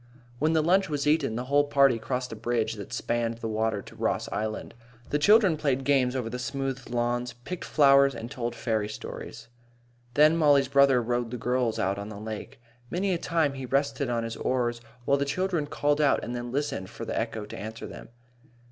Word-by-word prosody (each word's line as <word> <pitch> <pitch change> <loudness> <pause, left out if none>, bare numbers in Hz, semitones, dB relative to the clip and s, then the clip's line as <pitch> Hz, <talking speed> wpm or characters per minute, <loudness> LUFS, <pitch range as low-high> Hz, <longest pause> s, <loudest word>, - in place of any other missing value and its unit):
When 155 +2 +2
the 160 -1 +3
lunch 190 +3 +3
was 145 -1 -1
eaten, 150 -6 +2
the 120 - -2
whole 145 +3 +3
party 140 -4 +4
crossed 125 +3 -3
a - - -5
bridge 115 0 -1
that 105 -3 -9
spanned 115 -1 -1
the 115 - -4
water 110 -2 -1
to - - -13
Ross - - -1
Island. 110 +2 -3 0.4
The 150 - +2
children 200 0 +5
played 135 -3 0
games 130 -2 +2
over 125 -3 -2
the 125 +2 -5
smooth 135 0 -4
lawns, 120 0 -1
picked 125 +10 -7
flowers, 140 -2 +5
and 115 +2 -7
told 120 -3 -3
fairy 110 -2 -1
stories. 110 - -8 0.7
Then 155 +2 +6
Mollie's 145 -4 +4
brother 140 -3 +5
rowed 120 0 -1
the 125 - -5
girls 125 -1 0
out 95 +2 0
on 100 +1 -6
the 105 - -8
lake. 110 +1 -7 0.3
Many 190 +2 0
a 170 - -1
time 165 -5 +1
he 135 -1 -6
rested 140 0 0
on 120 -1 0
his 115 0 -5
oars 120 -2 -1 0.2
while 140 - +3
the 140 - 0
children 170 +1 -1
called 145 0 +1
out 145 -2 +3
and 120 - -4
then 120 0 -5
listened 130 -9 -2
for 115 0 -7
the - - -4
echo 110 -2 -3
to - - -9
answer 110 +2 -7
them. - - -10
125 Hz, 205 wpm, -27 LUFS, 115-145 Hz, 0.7 s, Then